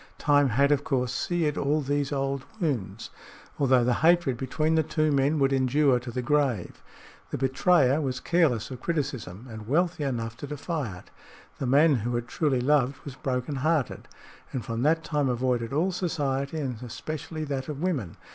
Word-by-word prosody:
Time 145 -2 +3
had, 140 +5 +3
of 145 -1 +2
course, 125 -3 0
seared 160 0 0
all 145 +2 +1
these 145 0 -1
old 135 -1 -1 0.2
wounds, 115 - -2 0.5
although 130 -3 +4
the 125 +1 +2
hatred 170 -5 +4
between 155 +6 -1
the 160 - +4
two 155 0 0
men 140 +2 +2
would 135 -1 +2
endure 135 0 +3
to 120 0 -8
the 125 +1 -3
grave. 130 -9 0 0.5
The - - -3
betrayer 135 +2 +3
was 130 -3 -2
careless 145 -9 +1
of 125 -1 -7
criticism 130 - -3
and 110 -2 -9
wealthy 165 +3 +1
enough 115 -4 -2
to 145 - -7
defy 145 - -4
it. - - -16 0.5
The 135 - -2
man 145 +2 +5
who 120 +2 -2
had 120 0 -2
truly 135 -2 0
loved 135 0 +2
was 140 - -6
broken 130 +1 -3
hearted, 150 -1 0 0.4
and 125 -5 -4
from 115 0 -3
that 160 +4 +2
time 145 -3 0
avoided 125 -2 0
all 165 +7 +1
society 145 -5 -2
and 130 -6 -3
especially 155 +6 -5
that 140 -2 -3
of 145 -2 -5
women. 145 - -2
135 Hz, 175 wpm, -27 LUFS, 125-150 Hz, 0.5 s, man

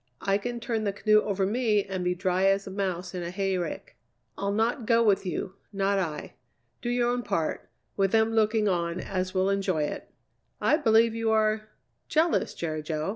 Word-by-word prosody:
I 195 +1 +1
can 240 +3 -4
turn 230 -2 -2
the 200 -2 -1
canoe 215 +1 +4
over 195 -2 -1
me 215 -1 +1
and 190 -2 -4
be 180 0 0
dry 185 +1 +1
as 195 0 +3
a 195 - -7
mouse 185 -2 -3
in 180 - -4
a 170 - -4
hayrick. 185 -2 -3 0.4
I'll 200 0 -2
not 225 +3 0
go 230 -1 +4
with 200 -3 +2
you, 180 +2 -3 0.2
not 195 0 +1
I. 155 -5 -4 0.5
Do 240 - -3
your 245 0 +1
own 245 0 0
part, 165 -8 -2 0.3
with 195 -1 +1
them 225 0 +3
looking 215 -1 +2
on 170 -2 0
as 185 0 -3
will 190 +1 +2
enjoy 190 -5 0
it." 150 - -5 0.5
"I 300 - +3
believe 225 -5 +4
you 225 0 -1
are 215 0 +1 0.4
jealous, 320 +2 +1
Jerry 155 -2 -3
Jo." 155 +2 -3
200 Hz, 190 wpm, -27 LUFS, 185-220 Hz, 0.5 s, canoe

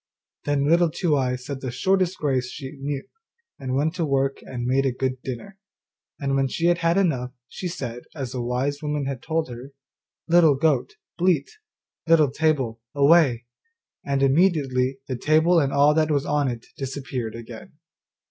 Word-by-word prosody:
Then 145 -1 +1
Little 170 +2 +4
Two 165 -1 0
eyes 125 -2 -1
said 140 -2 -5
the 130 - -3
shortest 185 +8 +1
grace 130 -4 0
she 135 0 -7
knew, 140 0 -3 0.6
and 130 -1 -1
set 155 +3 0
to 170 - 0
work 135 -1 0
and 120 -2 -6
made 130 +2 +2
a 135 - +1
good 130 0 -3
dinner. 135 - -7 0.6
And 140 -1 -1
when 135 0 +2
she 165 +6 -2
had 175 0 +3
had 170 +1 +2
enough, 130 -10 0
she 180 - -6
said, 125 -8 -6
as 135 -5 -4
the 125 - -3
wise 130 +4 -1
woman 150 -2 -2
had 135 -2 -4
told 160 0 -1
her, 125 +4 -9 0.5
'Little 165 -4 +5
goat, 160 - +1 0.2
bleat, 175 -5 +2 0.6
Little 155 -4 +5
table, 135 -7 0
away,' 140 -5 +4 0.6
and 140 -1 0
immediately 135 -4 +2
the 130 - -2
table 160 +6 +4
and 140 -3 +1
all 145 +2 +4
that 155 0 +2
was 145 -2 +1
on 145 -1 +1
it 120 -2 -4
disappeared 130 -4 -5
again. 115 -1 -10
140 Hz, 170 wpm, -24 LUFS, 130-160 Hz, 0.6 s, Little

